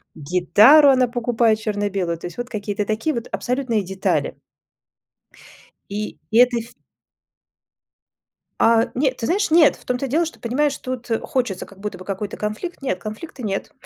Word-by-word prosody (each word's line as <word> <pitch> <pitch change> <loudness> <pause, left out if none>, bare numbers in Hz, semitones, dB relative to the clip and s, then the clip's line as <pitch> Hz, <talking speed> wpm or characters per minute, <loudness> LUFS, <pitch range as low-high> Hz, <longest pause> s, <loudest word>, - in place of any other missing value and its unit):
гитару 205 - +5
она 255 -2 +4
покупает 235 -2 +1
черно-белую. 200 -5 -2
То 165 - -7
есть 175 - -10
вот 240 0 -5
какие-то 205 -1 -3
такие 220 +9 -1
вот 235 0 -4
абсолютные 250 -3 -1
детали. 190 +1 -1 1.5
И 210 +1 -5
это 245 +1 +5
фи 235 +2 -12 1.9
А 230 0 +4
нет, 260 0 0
ты 230 - -4
знаешь, 400 - +1
нет. 315 -1 +5
В - - -20
том-то 250 +2 -2
и - - -6
дело, 325 +6 +2
что, 325 - -8
понимаешь, 275 +4 0
тут 255 -2 -6
хочется 245 - -2
как 195 -1 -17
будто 210 -2 -5
бы 185 - -10
какой-то 200 +1 -4
конфликт. 215 +10 -5
Нет, 185 -9 -2
конфликта 220 - -8
нет. 195 -3 -3
230 Hz, 155 wpm, -21 LUFS, 205-260 Hz, 1.9 s, гитару